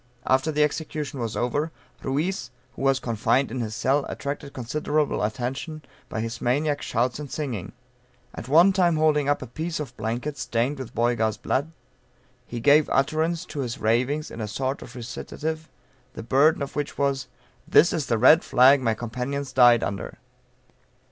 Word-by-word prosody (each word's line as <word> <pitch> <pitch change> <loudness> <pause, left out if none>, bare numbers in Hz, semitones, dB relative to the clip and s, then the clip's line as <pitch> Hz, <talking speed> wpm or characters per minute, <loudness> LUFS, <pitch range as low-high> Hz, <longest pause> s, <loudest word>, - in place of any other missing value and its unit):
After 130 +4 +2
the 150 0 +3
execution 150 -1 -3
was 115 -3 -3
over, 145 +8 0 0.3
Ruiz, 145 +1 -2 0.3
who - - -8
was 135 -1 +3
confined 115 +2 +1
in 130 - -3
his 110 -2 -3
cell, 140 +2 +1
attracted 140 0 -5
considerable 150 +4 -1
attention, 135 +8 -3 0.3
by 110 - -3
his 115 +1 -5
maniac 145 +4 +1
shouts 120 +3 -1
and 145 -2 -6
singing. 115 - -4 0.6
At 115 - -8
one 170 +8 +6
time 175 -3 +3
holding 150 -2 +2
up 145 - +1
a - - -6
piece 160 +7 -4
of 150 - -6
blanket, 120 +6 -3
stained 125 +5 -1
with 130 - -8
Boyga's 115 -2 +1
blood, 140 +7 -1 0.8
he 120 - -5
gave 145 +6 +5
utterance 160 +4 +1
to 145 - -7
his 125 -4 -3
ravings 125 +7 0
in 115 - -7
a 110 - -3
sort 130 +6 -3
of 125 - -11
recitative, 155 +6 -5 0.4
the 115 - -7
burden 140 +5 +3
of 140 - -7
which 145 -1 -3
was 140 -1 0 0.4
"This 170 - +5
is 150 -4 -2
the 115 - +1
red 140 +8 +6
flag 135 +1 +5
my 115 -3 +1
companions 125 +4 -4
died 120 -2 +6
under!" 100 -1 -4
135 Hz, 170 wpm, -25 LUFS, 120-150 Hz, 0.8 s, one